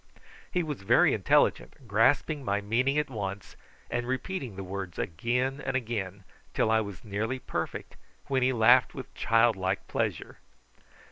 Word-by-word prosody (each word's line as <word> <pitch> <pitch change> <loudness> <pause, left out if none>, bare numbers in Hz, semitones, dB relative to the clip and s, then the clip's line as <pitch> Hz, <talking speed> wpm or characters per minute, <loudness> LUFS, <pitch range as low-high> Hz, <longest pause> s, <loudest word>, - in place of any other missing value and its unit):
He 180 - 0
was 150 -8 -5
very 95 - +4
intelligent, 130 - +1
grasping 135 +7 +2
my 100 -4 0
meaning 120 +7 +1
at 150 -1 +1
once, 100 -6 -6 0.3
and 120 0 -3
repeating 130 - -3
the 95 - -6
words 95 -2 -6
again 125 - -1
and - - -2
again, 105 -6 -3 0.3
till 110 - +2
I 110 0 +4
was 100 -3 -8
nearly 110 +5 -2
perfect, - - -5 0.3
when 135 -1 0
he 130 +1 +3
laughed 120 +1 +5
with - - -8
childlike 110 -5 +1
pleasure. - - -3
115 Hz, 145 wpm, -28 LUFS, 100-130 Hz, 0.3 s, laughed